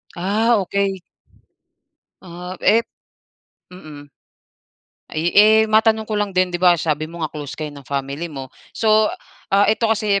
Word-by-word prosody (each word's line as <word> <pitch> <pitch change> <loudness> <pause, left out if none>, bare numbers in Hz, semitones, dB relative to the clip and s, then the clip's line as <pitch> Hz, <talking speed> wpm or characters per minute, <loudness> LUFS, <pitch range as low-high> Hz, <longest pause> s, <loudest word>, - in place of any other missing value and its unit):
Ah, 215 +6 +1
okey. 195 0 -2 1.2
Ah, 180 +1 -8
ep 230 +2 +3 0.9
mm. 150 -5 -12 1.0
Ay, 160 +3 -2
eh, 215 +2 +6
matanong 220 0 +2
ko 215 - -5
lang 205 - -1
din, 185 -1 +1
'di 175 - -2
ba 175 -2 +5
sabi 155 0 -2
mo 170 0 -9
nga 155 - -3
close 145 -2 -7
kayo 155 -1 -5
ng 140 -2 -13
family 140 +4 -4
mo. 135 -3 -8 0.2
So, 215 -1 +3 0.4
ah, 200 +1 +4
ito 220 +2 +1
kasi, 210 -2 +1
185 Hz, 145 wpm, -20 LUFS, 155-215 Hz, 1.2 s, eh